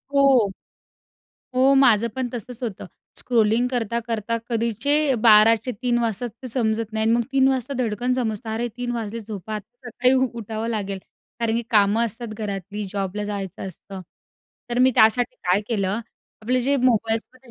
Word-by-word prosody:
हो. 265 -7 +5 1.1
हो, 265 +2 +4
माझं 235 -4 +4
पण 255 -2 -1
तसंच 245 +2 -7
होतं. 215 -6 -5 0.3
स्क्रोलिंग 235 0 +2
करता-करता 230 -2 -2
कधीचे 230 +4 0 0.3
12 220 0 +7
चे 250 - -3
3 240 -1 +2
वाजतात 235 +1 -1
ते 255 - -5
समजत 225 -2 0
नाही. 220 0 0
आणि 225 - +3
मग 235 -1 +1
3 270 0 +4
वाजता 265 +1 -1
धडकन 245 +1 -1
समजतं. 220 -3 -3
अरे! 230 +2 -2
3 245 -1 -3
वाजले, 230 -1 -4
झोपा 215 0 -7
आता, 240 +4 -9
सकाळी 250 +2 +2 0.3
उठावं 220 +1 -4
लागेल, 200 -3 -3 0.4
कारण 230 0 +1
की 235 - -1
कामं 210 +2 +4
असतात 235 +2 -4
घरातली, 205 -1 -4
जॉबला 200 +1 -3
जायचं 195 -2 -5
असतं. 190 +2 -10 0.7
तर 240 - 0
मी 255 +1 +5
त्यासाठी 220 +3 +4
काय 180 +2 +3
केलं, 205 -1 -1 0.4
आपले 250 +3 +1
जे 275 +3 +2
मोबाईल्समध्ये 235 +2 0
230 Hz, 160 wpm, -23 LUFS, 210-245 Hz, 1.1 s, 12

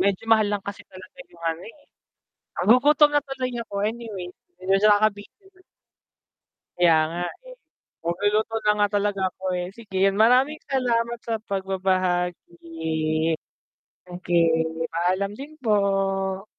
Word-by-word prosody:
Medyo 200 +2 +1
mahal 215 -2 +4
lang 205 -1 -2
kasi 200 0 -6
talaga 190 +9 -14
'yong 170 -1 -14
ano, 165 +2 -7
eh. 230 - -13 0.8
Nagugutom 290 +6 +5
na 290 - +3
tuloy 265 -3 -4
ako, 205 - -13
anyway. 220 -5 -5 0.3
Medyo 195 +3 +3
nakakabitin. 215 - -1 1.2
Kaya 170 -2 +5 0.2
nga, 175 +1 -4 0.2
eh. - - -11 0.5
Magluluto 205 +6 0
na 210 - +5
nga 205 0 +3
talaga 200 -1 -1
ako, 190 - -16
eh. 180 - -3
Sige, 215 -5 -6
maraming 250 +8 +3
salamat 235 -2 0
sa 230 - -3 0.2
pagbabahagi. 175 -4 -1 0.8
Okey, 175 -1 +1 0.5
paalam 185 +4 0
din 280 +3 -9
po. 195 -2 0
200 Hz, 120 wpm, -24 LUFS, 180-230 Hz, 1.2 s, Nagugutom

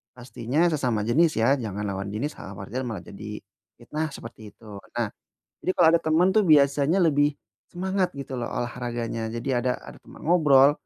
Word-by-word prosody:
pastinya 125 +6 0
sesama 125 -7 0
jenis 160 +7 +4
ya, 125 +5 +4
jangan 105 -6 -4
lawan 100 0 -4
jenis. 130 +8 -2
Hal-hal 100 +1 -9
wajar 110 +6 -4
malah 110 - -4
jadi 105 +1 -8 0.4
fitnah, 150 +6 -3
seperti 115 -4 -10
itu. 110 - -21 0.3
Nah, 120 -2 0 0.5
jadi 185 - -1
kalau 175 -3 +6
ada 170 - +4
teman 160 +3 +3
tuh 215 -2 +4
biasanya 145 +3 +4
lebih 145 -2 +3 0.3
semangat 185 +1 -1
gitu 140 -1 -7
lho 120 - -3
olahraganya. 120 -2 -3
Jadi 115 +3 -5
ada 125 0 +1
ada - - -12
teman - - -14
ngobrol 145 -5 +6
130 Hz, 170 wpm, -25 LUFS, 115-155 Hz, 0.5 s, kalau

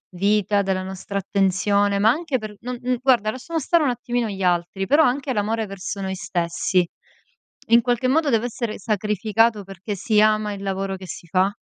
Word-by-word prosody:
vita, 205 +1 +2
della 190 -1 -1
nostra 190 +1 -5
attenzione, 200 +1 +1
ma 215 +2 +5
anche 300 -2 -1
per 215 -2 -8
non 250 +1 -4
n 250 0 0
guarda, 245 -5 +3
lasciamo 290 +8 -3
stare 325 +3 +2
un 270 - +2
attimino 240 -1 -2
gli 195 -1 -6
altri, 180 +2 0
però 295 +3 +5
anche 260 +1 0
l'amore 220 +1 -1
verso 195 0 -6
noi 190 -1 -3
stessi. 175 0 0 0.8
In 235 +1 +6
qualche 245 +2 0
modo 300 +2 +2
deve 230 -1 +2
essere 235 -3 -4
sacrificato 215 +1 +1
perché 195 +2 -6
si 210 +2 +2
ama 215 -1 +2
il 200 0 -8
lavoro 195 0 -2
che 185 -1 -10
si 170 - -8
fa? 185 +3 +2
210 Hz, 185 wpm, -22 LUFS, 195-240 Hz, 0.8 s, In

